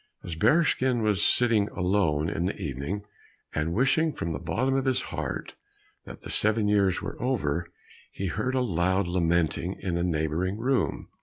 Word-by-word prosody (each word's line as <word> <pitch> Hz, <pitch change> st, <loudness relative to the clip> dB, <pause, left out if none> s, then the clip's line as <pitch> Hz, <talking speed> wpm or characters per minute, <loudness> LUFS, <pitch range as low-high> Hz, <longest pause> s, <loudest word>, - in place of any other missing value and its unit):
As 85 Hz, -, -5 dB
Bearskin 130 Hz, -, +2 dB
was 105 Hz, -2 st, +2 dB
sitting 115 Hz, -4 st, +4 dB
alone 90 Hz, -5 st, +1 dB
in 85 Hz, +1 st, -1 dB
the 100 Hz, -, -4 dB
evening, 75 Hz, +5 st, -4 dB, 0.5 s
and 75 Hz, +2 st, -1 dB
wishing 135 Hz, -, +2 dB
from 80 Hz, 0 st, -3 dB
the -, -, -4 dB
bottom 105 Hz, +12 st, 0 dB
of 135 Hz, 0 st, 0 dB
his 130 Hz, -1 st, +2 dB
heart -, -, -4 dB, 0.5 s
that -, -, -10 dB
the -, -, -8 dB
seven 110 Hz, 0 st, +2 dB
years 100 Hz, -3 st, +2 dB
were -, -, -6 dB
over, 85 Hz, -, -1 dB, 0.4 s
he 95 Hz, -, -5 dB
heard 110 Hz, +8 st, -1 dB
a 130 Hz, -, +2 dB
loud 95 Hz, -3 st, +1 dB
lamenting 85 Hz, 0 st, 0 dB
in 90 Hz, -3 st, -2 dB
a 85 Hz, -, 0 dB
neighboring 85 Hz, +3 st, -1 dB
room. 130 Hz, +3 st, -1 dB
95 Hz, 165 wpm, -27 LUFS, 85-120 Hz, 0.5 s, sitting